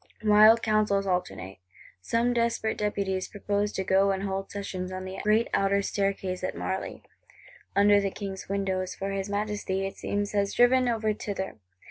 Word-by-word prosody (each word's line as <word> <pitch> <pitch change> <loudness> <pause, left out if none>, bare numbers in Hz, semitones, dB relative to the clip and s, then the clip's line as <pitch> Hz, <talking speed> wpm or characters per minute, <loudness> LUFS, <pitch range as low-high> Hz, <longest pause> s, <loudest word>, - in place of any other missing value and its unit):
Wild 215 +2 +6
counsels 215 -2 +2
alternate. 180 - -3 0.4
Some 235 - +1
desperate 235 -2 0
Deputies 195 -3 -1
propose 205 0 -2
to 190 - -2
go 195 +1 +3
and 195 0 -1
hold 195 0 -3
session 185 -2 -5
on 185 0 -5
the 185 0 -6
great 215 +2 +2
outer 200 0 +2
Staircase 195 -2 -2
at - - -3
Marly, - - -4 0.7
under 205 0 +5
the 200 - 0
King's 195 -1 -7
windows; 190 -2 -2
for 195 +1 -4
his 195 0 -3
Majesty, 205 -2 -2
it 195 - -6
seems, 205 0 -2
has 200 -1 0
driven 250 +1 +4
over 220 -2 0
thither. 195 - -5
200 Hz, 160 wpm, -27 LUFS, 190-210 Hz, 0.7 s, Wild